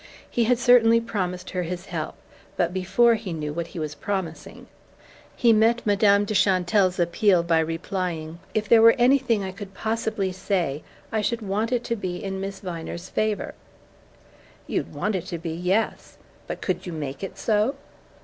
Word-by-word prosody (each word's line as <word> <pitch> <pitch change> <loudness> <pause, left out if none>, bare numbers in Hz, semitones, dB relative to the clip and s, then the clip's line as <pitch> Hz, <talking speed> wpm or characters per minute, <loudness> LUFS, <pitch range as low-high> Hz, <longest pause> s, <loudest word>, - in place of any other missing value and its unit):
He 235 - 0
had 245 +2 +3
certainly 230 -1 +5
promised 185 -5 -3
her 180 - -1
his 175 +1 -5
help 160 -5 -4 0.4
but 175 0 +1
before 210 +6 +3
he 210 -5 -3
knew 150 -2 -4
what 170 +1 -3
he 170 - -11
was 155 -2 -3
promising. 165 0 -5 0.7
He 235 -2 +4
met 225 +2 +3
Madame 205 0 +4
de 215 - -3
Chantelle's 185 -1 +3
appeal 175 +1 +3
by 165 -1 +2
replying: 165 0 -3 0.2
"If 215 -1 0
there 230 +1 +6
were 230 0 +8
anything 245 -4 +3
I 190 - -4
could 195 0 -10
possibly 220 -3 -1
say 180 -6 -1 0.3
I 220 - 0
should 225 +2 -1
want 210 +4 -1
it 245 -1 0
to 235 - -1
be 185 -5 -4
in 190 0 -4
Miss 195 0 -5
Viner's 170 -1 -6
favour." 215 -1 -1 1.1
"You'd - - -2
want 210 - -2
it 185 -2 -3
to 170 - -4
be 165 0 -5
yes! 180 +6 -1 0.3
But - - -5
could 185 0 -2
you 175 - -5
make 140 -2 -5
it 195 - -6
so?" 220 +5 +1
190 Hz, 175 wpm, -24 LUFS, 175-220 Hz, 1.1 s, were